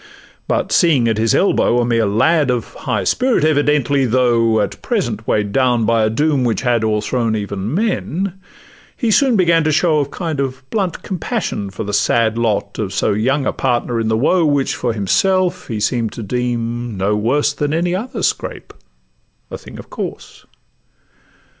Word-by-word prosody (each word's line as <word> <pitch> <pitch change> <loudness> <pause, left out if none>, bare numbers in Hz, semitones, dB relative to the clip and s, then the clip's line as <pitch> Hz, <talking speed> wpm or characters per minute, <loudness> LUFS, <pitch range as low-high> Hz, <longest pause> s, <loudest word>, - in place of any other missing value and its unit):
But - - -1
seeing 150 -9 +3
at 110 -1 0
his 115 0 +2
elbow 125 -10 +2
a 120 - +1
mere 115 -2 +1
lad, 145 +8 +2
Of 120 -2 -2
a - - -12
high 105 -3 -1
spirit 250 - +1
evidently, 145 -3 +2
though 115 -2 +2
At 100 -2 -3
present - - -2
weigh'd 105 -1 0
down 125 -3 +2
by 115 0 +2
a 110 - +2
doom 145 +3 +1
which 120 0 -1
had 120 -3 +1
O'erthrown 110 +2 0
even 100 0 -4
men, 190 -2 -2 0.6
he 235 -3 0
soon 265 +1 +3
began 170 -4 +3
to 155 - +1
show 155 0 +2
A 140 - 0
kind 160 -1 -4
of 130 -1 -4
blunt 195 -6 -2
compassion 185 - -3
for 100 - -6
the 105 0 -5
sad 110 +2 +2
Lot 115 -3 -1
of - - -3
so - - +1
young 130 +7 0
a - - 0
partner 120 -2 -1
in 115 - -1
the 110 0 +1
woe, 170 +8 +2
Which 145 -3 +1
for 120 - -2
himself 175 - +1
he 110 -4 -3
seem'd 115 +1 -1
to 115 - -6
deem 120 0 -3
no 100 +3 +1
worse 135 +8 +1
Than 145 0 -2
any 175 +3 0
other 220 +2 -4
scrape, - - -3 0.8
a - - -5
thing - - -12
of - - -12
course. - - -7
125 Hz, 180 wpm, -18 LUFS, 110-155 Hz, 0.8 s, seeing